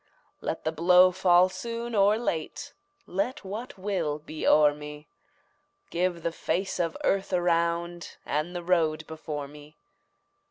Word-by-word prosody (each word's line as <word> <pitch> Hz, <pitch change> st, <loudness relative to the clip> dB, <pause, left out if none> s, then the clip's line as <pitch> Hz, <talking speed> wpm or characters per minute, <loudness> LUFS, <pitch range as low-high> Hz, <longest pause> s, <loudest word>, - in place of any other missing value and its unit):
Let -, -, -4 dB
the 160 Hz, -, 0 dB
blow 180 Hz, +3 st, +6 dB
fall 180 Hz, -1 st, +5 dB
soon 230 Hz, +5 st, -5 dB
or 205 Hz, 0 st, +4 dB
late, 240 Hz, -, -3 dB, 0.3 s
Let 245 Hz, +9 st, -2 dB
what 225 Hz, +7 st, -6 dB
will 185 Hz, -7 st, -1 dB
be 155 Hz, +1 st, -5 dB
o'er 150 Hz, -1 st, +6 dB
me; 150 Hz, 0 st, -9 dB, 0.8 s
Give 175 Hz, -1 st, -1 dB
the 170 Hz, -, 0 dB
face 190 Hz, +4 st, -2 dB
of 165 Hz, -2 st, -1 dB
earth 195 Hz, 0 st, +1 dB
around, 170 Hz, -1 st, 0 dB
And 155 Hz, +5 st, -2 dB
the 175 Hz, -, -4 dB
road 160 Hz, -3 st, +1 dB
before 150 Hz, -2 st, -6 dB
me. 150 Hz, +1 st, -14 dB
175 Hz, 135 wpm, -27 LUFS, 155-190 Hz, 0.8 s, blow